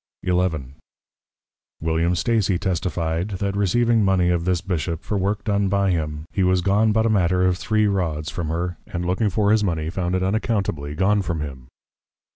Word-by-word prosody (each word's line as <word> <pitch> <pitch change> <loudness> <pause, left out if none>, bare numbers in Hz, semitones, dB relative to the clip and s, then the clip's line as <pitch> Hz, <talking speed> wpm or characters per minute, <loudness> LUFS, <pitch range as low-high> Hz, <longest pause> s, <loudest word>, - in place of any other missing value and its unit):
XI. 90 - +1 1.5
William 80 +2 +1
Stacy 105 -1 +1
testify'd, 90 0 -2
That 100 +1 -2
receiving 115 +3 +2
Mony 95 -3 +3
of 85 -1 0
this 90 -2 +1
Bishop, 85 -2 -3
for 105 - -3
work 100 +2 -1
done 100 -2 +1
by 100 0 +2
him; 75 -3 -2
he 100 - -1
was 90 0 +3
gone 105 +4 +3
but 110 +1 +2
a - - +3
matter 90 -2 +2
of 90 -1 +1
three 110 -1 +1
Rods 85 -6 -1
from 85 -3 -4
her, 85 +2 -2
and 90 0 -4
looking 95 +4 +1
for 100 +2 +1
his 110 -1 +3
Mony, 80 -4 -1
found 90 0 -1
it 95 - 0
unaccountably 95 -8 -1
gone 100 +4 +2
from 85 -4 -3
him. 65 -4 -7
90 Hz, 180 wpm, -22 LUFS, 85-100 Hz, 1.5 s, Mony